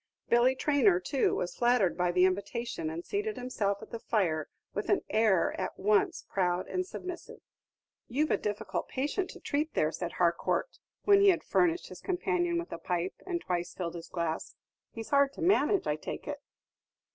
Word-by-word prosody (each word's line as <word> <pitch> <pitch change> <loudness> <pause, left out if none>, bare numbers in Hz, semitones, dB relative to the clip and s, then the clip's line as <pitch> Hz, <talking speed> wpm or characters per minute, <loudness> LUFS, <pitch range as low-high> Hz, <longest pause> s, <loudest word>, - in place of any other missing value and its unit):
Billy 245 +2 +5
Traynor, 260 -11 +3
too, 255 +9 +1
was 175 - -3
flattered 240 -7 +3
by 180 0 +1
the 180 +1 +4
invitation, 200 -2 -2
and 165 +2 -6
seated 420 +2 -2
himself 210 -5 -2
at - - -12
the 230 - -5
fire 170 -10 0 0.2
with - - -3
an 395 - +3
air 215 -5 +3
at - - -4
once 205 +1 +2
proud 180 -2 0
and 365 0 -2
submissive. 360 -2 -7 0.7
"You've 290 +5 0
a - - +4
difficult 210 -1 -3
patient 295 +8 -1
to - - -10
treat 300 +2 -2
there," 155 - +2
said 170 +2 -4
Harcourt, 175 - 0 0.2
when 400 -1 +6
he 400 - +7
had 365 - +2
furnished 345 0 +1
his - - -10
companion 355 -2 0
with 340 +1 -4
a - - -5
pipe, 180 +1 -2
and 345 -2 -1
twice 175 -1 -3
filled 170 -2 -3
his 170 -1 -8
glass; 170 -2 -3 0.3
"he's 225 -1 -8
hard 280 -1 +4
to - - -9
manage, 370 +1 +3
I 150 - 0
take - - -6
it?" 290 -1 -4
230 Hz, 180 wpm, -30 LUFS, -, 0.7 s, he